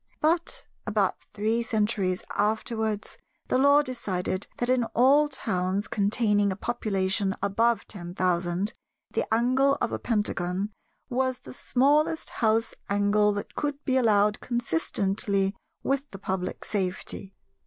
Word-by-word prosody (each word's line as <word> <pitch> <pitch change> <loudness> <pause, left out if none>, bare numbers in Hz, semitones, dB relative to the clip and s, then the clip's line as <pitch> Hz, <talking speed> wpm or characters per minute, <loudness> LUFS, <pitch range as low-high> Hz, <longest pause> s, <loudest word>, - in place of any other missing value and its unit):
But, 330 +2 0 0.2
about - - +1
three 220 +3 0
centuries 210 -5 0
afterwards, 220 0 -1 0.3
the 255 - +3
Law 285 +2 +6
decided 195 -7 -3
that 245 - -1
in 250 -1 +3
all 275 +5 +5
towns 195 -6 -1
containing 205 -1 +2
a - - -2
population 195 -3 0
above 225 +3 +1
ten 175 -3 -8
thousand, 180 +2 0 0.4
the - - -2
angle 255 +5 +3
of - - -1
a - - -2
Pentagon 205 -3 -1 0.4
was 255 0 0
the - - -12
smallest 295 +6 +2
house 225 0 +2 0.2
angle 205 +1 +3
that 205 - -5
could 290 -1 -3
be 260 - +1
allowed 210 -4 +3
consistently 195 -2 0 0.3
with 275 +1 -1
the 195 - -9
public 190 -1 -3
safety. 190 0 -3
215 Hz, 125 wpm, -27 LUFS, 195-250 Hz, 0.4 s, Law